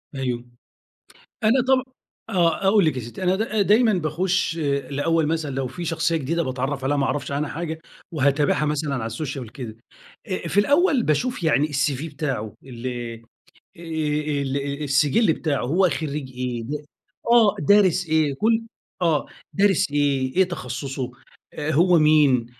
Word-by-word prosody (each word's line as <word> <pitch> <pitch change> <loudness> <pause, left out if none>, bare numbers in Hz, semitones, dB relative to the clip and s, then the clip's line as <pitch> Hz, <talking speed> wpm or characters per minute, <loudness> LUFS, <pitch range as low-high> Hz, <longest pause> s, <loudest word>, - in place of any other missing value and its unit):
أيوه. 125 -3 -3 1.0
أنا 235 +4 +4
طب 260 0 +2 0.4
آه. 175 +1 +1
أقول 200 -2 +5
لِك 155 - +1
يا - - -3
سِتّي. 120 +11 -8
أنا 185 +1 +3
د 215 -1 0
دايمًا 220 +1 +5
باخُش 175 +1 0
الأول 145 +2 0
مثلًا 155 -4 -2
لو 135 -1 -1
في 170 +8 -7
شخصية 165 0 0
جديدة 165 +4 -1
باتعرّف 130 +2 -3
عليها 145 +2 +1
ما 140 - +1
أعرفش 145 0 -2
عنها 145 +1 -1
حاجة، 160 -1 -4 0.3
وهاتابعها 145 0 +2
مثلًا 150 -1 -1
على 120 -4 -2
السوشيال 135 +2 -4
وكده. 115 -1 -8 0.5
أ 185 -3 -3
في 185 +5 +2
الأول 285 - +3
باشوف 190 - 0
يعني 150 -1 +3
الCV 145 -1 -1
بتاعه 130 -9 -3
اللي 120 -2 -5
آآ 115 - -15 0.6
ال 150 -3 -2
أ - - -2
السجل 145 - +3
بتاعه 145 -6 -2
هو 180 +7 +3
خرِّيج 150 -4 -4
إيه 125 -2 -3
ده 150 +5 -5 0.5
آه. 225 -4 +6
دارس 185 +1 +4
إيه؟ 155 -3 +2
كل 225 +7 +1 0.4
آه. 165 -4 +2 0.3
دارس 195 -3 +2
إيه؟ 140 -3 0
إيه 190 - +6
تخصُّصه؟ 135 -5 -5 0.4
أ 150 0 -3
هو 170 +3 +4
مين؟ 150 -6 +4
150 Hz, 155 wpm, -23 LUFS, 135-175 Hz, 1.0 s, آه